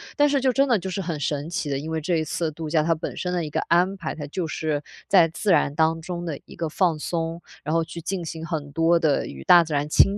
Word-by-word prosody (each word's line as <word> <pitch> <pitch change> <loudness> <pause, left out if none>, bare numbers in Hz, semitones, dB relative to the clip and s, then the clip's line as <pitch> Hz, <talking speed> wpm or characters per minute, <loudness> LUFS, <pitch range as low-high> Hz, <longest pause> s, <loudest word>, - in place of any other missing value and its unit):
但 290 -1 +4
是， 280 -1 +2
就 260 -1 +2
真 275 +2 +3
的 235 -4 +4
就 190 +1 -5
是 190 +2 -3
很 165 -4 -3
神 145 +2 -2
奇 175 -4 -2
的， 140 - 0
因 155 +3 -6
为 160 - -1
这 170 +3 0
一 160 - 0
次 160 +1 -2
度 155 0 -6
假， 155 0 +3
它 165 0 +2
本 160 - -6
身 180 0 -2
的 175 -2 0
一 150 - -4
个 - - -1
安 180 +3 +2
排， 170 - -4
它 150 - -6
就 170 +3 -3
是 155 -1 -2 0.3
在 175 -4 +6
自 190 +5 -1
然 145 -4 +3
当 160 +1 +2
中 175 +1 -5
的 160 -5 -4
一 - - -13
个 165 -2 -3
放 170 0 +1
松， 165 +1 -3 0.2
然 150 - -2
后 165 - +3
去 170 - -8
进 180 +2 -3
行 160 0 -6
很 150 -4 -4
多 165 +2 +3
的 155 -4 +2
与 65 -1 -9
大 170 -2 +7
自 155 - -5
然 145 +1 0
亲 195 +6 +4
165 Hz, 305 characters per minute, -24 LUFS, 155-180 Hz, 0.3 s, 大